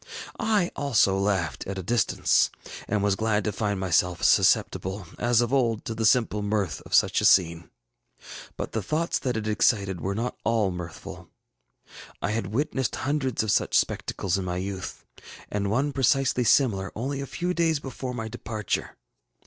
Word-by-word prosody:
I 210 -5 +1
also 115 -9 +2
laughed 95 -7 -1
at 100 0 -4
a 95 - -4
distance, 115 +3 +2 0.4
and 105 -1 0
was 100 -1 +2
glad 110 0 0
to 105 - -1
find 100 -1 -2
myself 90 -1 +1
susceptible, 95 +1 +2
as 120 -1 +3
of 120 +2 -1
old, 115 -5 +1
to 115 - -3
the 110 0 +1
simple 110 -3 +2
mirth 100 -6 -1
of - - 0
such - - +3
a - - +1
scene. 85 -3 +3 0.9
ŌĆ£But - - -4
the 110 - -2
thoughts 155 - -1
that 125 -3 -2
it 110 0 -3
excited 100 -4 +1
were 100 +1 -2
not 120 +3 -2
all 110 -4 +1
mirthful. 90 -2 -8 0.9
I 105 - -2
had 110 -3 -2
witnessed 130 +3 -1
hundreds 130 -4 -1
of 110 - 0
such - - +2
spectacles 95 0 -1
in 95 - -4
my 90 0 -2
youth, 95 0 -5 0.5
and 100 -1 -1
one 135 +7 0
precisely 130 -1 +2
similar 105 -8 +3
only 135 +5 -3
a 140 - -5
few 180 +6 -2
days 165 -3 +1
before 130 -2 -6
my 110 -2 -4
departure. 110 -2 -4
110 Hz, 170 wpm, -26 LUFS, 95-130 Hz, 0.9 s, as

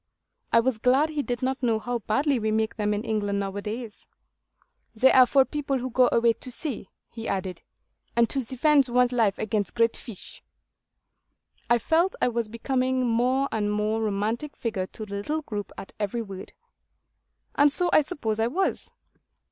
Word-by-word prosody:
I 230 - +5
was 240 -2 -1
glad 265 +6 +3
he 305 -2 -2
did 245 -2 -4
not 265 +1 -1
know 230 -3 +2
how 240 +2 -3
badly 270 +5 +1
we 220 0 -1
make 220 +1 0
them 210 -1 -1
in 210 +1 -1
England 205 -3 -1
now 195 -1 -3
a 205 - -3
days. 220 +2 -7 0.9
'They 255 +4 +5
are 255 -1 +7
for 270 +1 +4
people 280 -2 -2
who 255 0 -4
go 250 +1 +4
away 230 0 +4
to 255 - -11
sea,' 245 -6 -4 0.2
he 225 -1 -7
added, 190 -1 -3 0.5
'and 235 0 +4
to 270 -2 -1
defend 270 +2 +3
one's 250 0 +3
life 225 -5 +2
against 210 -3 -2
great 230 -1 +2
fish.' 220 -7 -10 1.3
I 240 - +5
felt 325 - +1
I - - +2
was 235 -2 -2
becoming 255 +2 0
a - - +1
more 250 +4 +1
and 210 -2 -1
more 210 +1 0
romantic 220 +7 -2
figure 200 -5 -3
to 215 - -8
the 200 - -9
little 305 +10 -3
group 205 -6 -5
at - - -9
every 215 +3 -2
word. 195 -2 -9 1.0
And 290 0 +4
so 350 +3 0
I - - +7
suppose 245 - -3
I 225 - +2
was. 370 +10 -1
235 Hz, 185 wpm, -26 LUFS, 215-260 Hz, 1.3 s, are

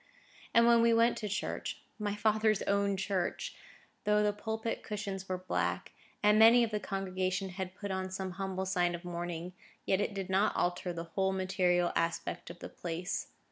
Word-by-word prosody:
And 230 0 +6
when 235 0 +6
we 230 0 +5
went 230 +1 +4
to 210 - -3
church,—my 210 0 -4
father's 215 0 +2
own 200 0 +1
church,—though 200 +2 -2
the 210 0 +2
pulpit 220 +2 -3
cushions 200 -3 -5
were 185 - 0
black, 185 0 -2 0.3
and 210 +1 +5
many 230 +2 +8
of 225 - -1
the 210 - 0
congregation 190 -1 -2
had 185 0 -5
put 200 -1 -5
on 190 0 -2
some 190 0 -4
humble 190 0 -3
sign 180 -2 +1
of 175 +1 -9
mourning, 175 0 -4 0.3
yet 190 +1 +2
it 205 - -2
did 195 -2 -3
not 195 +3 +3
alter 175 0 0
the 170 -1 -4
whole 190 -1 +1
material 185 -2 +2
aspect 165 0 -1
of 170 - -9
the - - -6
place. 175 +2 -4
195 Hz, 175 wpm, -32 LUFS, 185-210 Hz, 0.3 s, many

